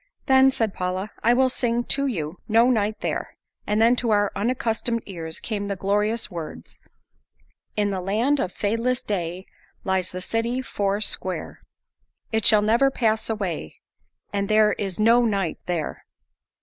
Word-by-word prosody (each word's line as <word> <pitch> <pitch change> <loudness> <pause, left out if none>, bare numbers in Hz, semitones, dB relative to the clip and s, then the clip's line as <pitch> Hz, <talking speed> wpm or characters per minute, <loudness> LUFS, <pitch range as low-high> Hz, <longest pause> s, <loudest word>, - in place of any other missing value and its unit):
"Then," 265 -1 +6
said 225 -6 -1
Paula, 185 +3 -3
"I 235 +2 +4
will 260 +1 +4
sing 240 -1 0
to 280 +3 0
you, 165 - -3
'No 230 +3 +5
Night 215 -2 0
There.'" - - -3 0.3
And 210 +1 +1
then 230 +2 +5
to 240 - -1
our 205 -1 +3
unaccustomed 230 0 -1
ears 165 -4 -6
came 205 -3 -3
the 200 - -2
glorious 210 +4 0
words: 165 -3 -8 1.0
In 205 -1 +1
the 190 -1 -2
land 225 +10 +1
of 185 - -1
fadeless 230 +6 -1
day, 180 -2 -3 0.4
Lies 190 -1 0
the 185 - -5
city 230 +6 -1
four 200 -4 -1
sqare, 185 -5 -2 0.7
It 220 -2 +2
shall 210 -1 +5
never 235 +6 +4
pass 220 -5 0
away, 185 - -3 0.6
And 200 0 -1
there 215 0 +5
is 195 -1 -4
no 230 +3 +5
night 195 -7 0
there. 170 -4 -3
210 Hz, 155 wpm, -24 LUFS, 190-230 Hz, 1.0 s, Then